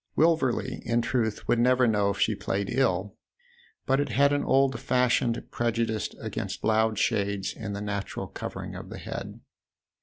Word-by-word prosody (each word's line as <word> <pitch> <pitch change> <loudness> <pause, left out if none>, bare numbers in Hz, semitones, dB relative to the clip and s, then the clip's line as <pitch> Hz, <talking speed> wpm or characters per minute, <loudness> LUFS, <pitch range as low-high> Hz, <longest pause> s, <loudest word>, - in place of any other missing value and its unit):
Wilverley, 160 -6 +2
in 120 0 +1
truth, 110 -5 -1
would 120 - +3
never 125 +1 +4
know 105 -2 +2
if 100 - -2
she 110 - +3
played 100 -1 -2
ill; 105 -6 0 0.7
but 135 +1 +2
it 145 - 0
had 140 +1 +3
an 145 - +1
old 135 -1 +3
fashioned 125 -2 +2
prejudice 115 -2 -1
against - - -5
loud 110 0 +2
shades 100 -3 0
in 105 -2 -5
the 100 - -4
natural 100 -1 -3
cover - - -6
ing - - -7
of - - -8
the - - -7
head. - - -7
115 Hz, 170 wpm, -27 LUFS, 105-130 Hz, 0.7 s, never